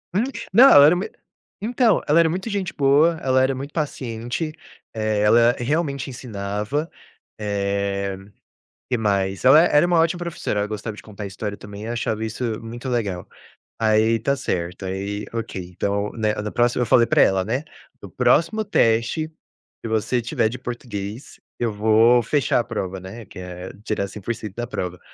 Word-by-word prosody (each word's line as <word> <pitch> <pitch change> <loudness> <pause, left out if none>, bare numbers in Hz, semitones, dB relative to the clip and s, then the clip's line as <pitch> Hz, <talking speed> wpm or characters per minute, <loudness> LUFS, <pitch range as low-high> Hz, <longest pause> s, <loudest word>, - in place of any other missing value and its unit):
Hum, 210 - +3 0.3
não, 235 +8 +8
ela 145 0 +9
era 165 - +5
uma 185 - -2
e - - -13 0.5
então, 240 -3 +3
ela 150 +3 +5
era 165 -1 +4
muito 190 +7 -3
gente 200 -3 -2
boa. 150 +4 +3
Ela 130 0 +3
era 135 +1 +2
muito 140 +3 -7
paciente. 130 0 -3 0.4
Eh, 110 -1 0
ela 115 +3 +5
realmente 140 +1 -1
ensinava. 110 +4 -4 0.5
Eh, 100 -1 -2 0.7
que 125 - +1
mais? 100 -2 0
Ela 135 +5 +8
era 150 -2 +4
uma 175 -2 +3
ótima 165 +2 +1
professora. 170 -11 -3
Ela 105 - 0
gostava 110 0 -5
de - - -11
contar 105 -1 -9
história 100 +1 -5
também 100 +1 -9
e - - -5
eu 115 - -3
achava 110 -2 -2
isso 110 0 -3
muito 120 +3 -7
legal. 105 -8 -2 0.5
Aí 110 +1 +3
tá 140 +5 0
certo. 90 -5 -3
Aí, 100 +2 -4
ok, 115 -4 -4
então, 100 +2 -1
né, 110 -2 0
no 105 0 -3
próximo 120 +1 +1
eu - - -1
falei 115 +1 +5
pra - - +4
ela, 95 -1 +3
né: 125 +7 -1 0.4
“No - - -9
próximo 180 +7 +2
teste 115 - +1 0.6
que 115 - -4
você 110 +3 0
tiver 120 -2 0
de 125 +3 -7
português, 120 -2 -6 0.2
eu 115 -2 0
vou 110 +3 +4
fechar 135 +2 +1
a - - -2
prova”, 95 -5 -4
né? 100 +4 -9
Que 90 - -13
é 90 0 -8
tirar 100 -3 -2
100% 105 0 -6
da 120 0 -3
prova. 90 -6 -5
115 Hz, 175 wpm, -22 LUFS, 105-140 Hz, 0.7 s, ela